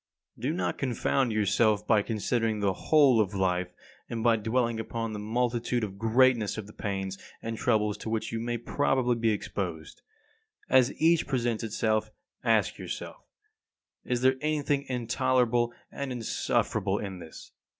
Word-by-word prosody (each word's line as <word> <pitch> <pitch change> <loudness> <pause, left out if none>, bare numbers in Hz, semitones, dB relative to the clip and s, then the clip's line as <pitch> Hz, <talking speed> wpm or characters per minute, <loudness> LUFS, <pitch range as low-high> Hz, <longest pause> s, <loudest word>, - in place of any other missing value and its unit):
36. 135 - -2
Do 165 - -3
not - - -1
confound 130 0 0
yourself 105 0 +2
by 110 -3 +4
considering 110 0 -1
the 100 -2 +1
whole 135 - +4
of 100 -1 -2
life, 90 -1 0 0.4
and 115 -1 -3
by 115 -1 +5
dwelling 115 +1 0
upon 115 0 -4
the 105 - -4
multitude 120 +2 -1
and 100 -2 -5
greatness 115 -1 +3
of 110 - -5
the 105 - -13
pains 95 -1 -4 0.2
and 115 0 -3
troubles 105 -3 +1
to - - -5
which 110 -1 -2
you 115 - -2
may 120 +1 -2
probably 125 0 +1
be 115 -1 +1
exposed. 95 - -4 0.7
As 130 0 +4
each 165 +1 +3
presents 120 -5 -1
itself 110 0 0 0.3
ask - - +2
yourself: - - -7 0.8
Is 125 -1 -1
there 130 +1 +4
anything 145 -2 0
intolerable 120 -1 +1 0.2
and 140 -1 -4
insufferable 105 -4 0
in 95 -3 -5
this? 80 -2 -11
115 Hz, 150 wpm, -28 LUFS, 105-125 Hz, 0.8 s, by